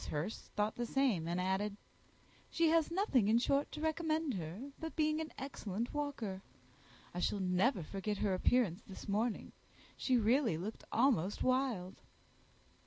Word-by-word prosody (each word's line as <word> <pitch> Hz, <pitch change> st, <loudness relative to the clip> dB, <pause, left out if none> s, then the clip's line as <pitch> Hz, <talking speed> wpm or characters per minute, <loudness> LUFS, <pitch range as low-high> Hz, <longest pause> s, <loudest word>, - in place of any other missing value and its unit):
Hurst 160 Hz, +9 st, -3 dB
thought 210 Hz, 0 st, 0 dB
the 240 Hz, -, -1 dB
same, 230 Hz, -12 st, +1 dB
and 175 Hz, +1 st, -1 dB
added, 190 Hz, +3 st, 0 dB, 0.7 s
"She 330 Hz, -1 st, +3 dB
has 325 Hz, -1 st, +3 dB
nothing, 335 Hz, -, +2 dB
in 220 Hz, +2 st, +5 dB
short, 275 Hz, +4 st, +1 dB
to 305 Hz, -, -5 dB
recommend 315 Hz, -2 st, 0 dB
her, 190 Hz, -, -5 dB
but 320 Hz, 0 st, -5 dB
being 310 Hz, 0 st, +2 dB
an 315 Hz, -, -5 dB
excellent 235 Hz, -5 st, -4 dB
walker. 255 Hz, -10 st, -3 dB, 0.7 s
I 175 Hz, -, -3 dB
shall 200 Hz, +3 st, 0 dB
never 185 Hz, +3 st, +2 dB
forget 200 Hz, +5 st, -3 dB
her 195 Hz, -1 st, +1 dB
appearance 205 Hz, -1 st, +2 dB
this 190 Hz, -, -9 dB
morning. 215 Hz, +3 st, -1 dB, 0.4 s
She 255 Hz, -2 st, +2 dB
really 230 Hz, -, +3 dB
looked 205 Hz, +7 st, -5 dB
almost 225 Hz, -, +2 dB
wild." 255 Hz, -8 st, 0 dB
225 Hz, 150 wpm, -35 LUFS, 190-280 Hz, 0.7 s, in